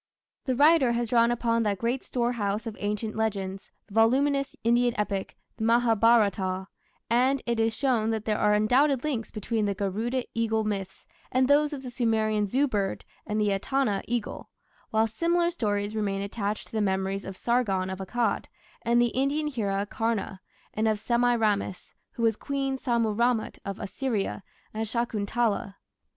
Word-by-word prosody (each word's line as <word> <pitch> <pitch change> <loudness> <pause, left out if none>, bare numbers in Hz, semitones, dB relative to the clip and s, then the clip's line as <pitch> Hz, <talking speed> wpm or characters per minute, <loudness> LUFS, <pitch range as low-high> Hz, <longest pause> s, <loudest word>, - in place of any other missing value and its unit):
The 260 -3 0
writer 290 -2 +5
has 235 -1 -1
drawn 235 -1 +4
upon 230 -1 +1
that 205 -3 0
"great 240 +5 -1
storehouse" 235 -3 -1
of 225 -2 -5
ancient 210 +1 -2
legends, 195 -3 -2 0.2
the - - -16
voluminous 275 +5 +2
Indian 240 0 +2
epic, 200 -2 -2 0.2
the - - -4
Mahabharata, 220 -5 +3 0.4
and 255 +4 +2
it 235 -1 -1
is 225 0 +1
shown 240 -5 +1
that 220 -1 -2
there 215 -1 0
are 210 0 +4
undoubted 255 +5 +3
links 265 -7 -2
between 215 +1 -2
the 200 -1 -1
Garuda 220 +6 -1
eagle 225 -1 0
myths 200 -3 -4 0.3
and 255 0 +3
those 295 +2 +4
of 280 -3 -6
the 250 - -6
Sumerian 220 -3 +1
Zu 270 +8 +2
bird 200 -6 -2 0.2
and 210 0 -1
the 210 -1 +2
Etana 205 +1 0
eagle, 235 -2 -3 0.4
while 220 0 +3
similar 340 +9 +1
stories 205 -8 -2
remain 200 -2 -1
attached 205 0 -3
to - - -20
the 220 - -1
memories 195 0 -1
of 190 -1 -7
"Sargon 200 -6 0
of 190 - -5
Akkad" 215 +3 -1 0.4
and 235 +1 +2
the 240 0 +4
Indian 280 +4 0
hero 205 -8 -1
Karna, 215 -3 -2 0.3
and 220 +1 0
of 215 -1 +2
Semiramis 225 -5 0 0.2
(who 230 - -4
was 225 -2 +3
Queen 275 +2 -2
Sammu 235 -4 0
ramat 235 0 0
of 200 -1 -5
Assyria) 220 -3 -2 0.3
and 220 +1 -2
Shakuntala. 220 -2 -1
225 Hz, 165 wpm, -27 LUFS, 205-245 Hz, 0.4 s, writer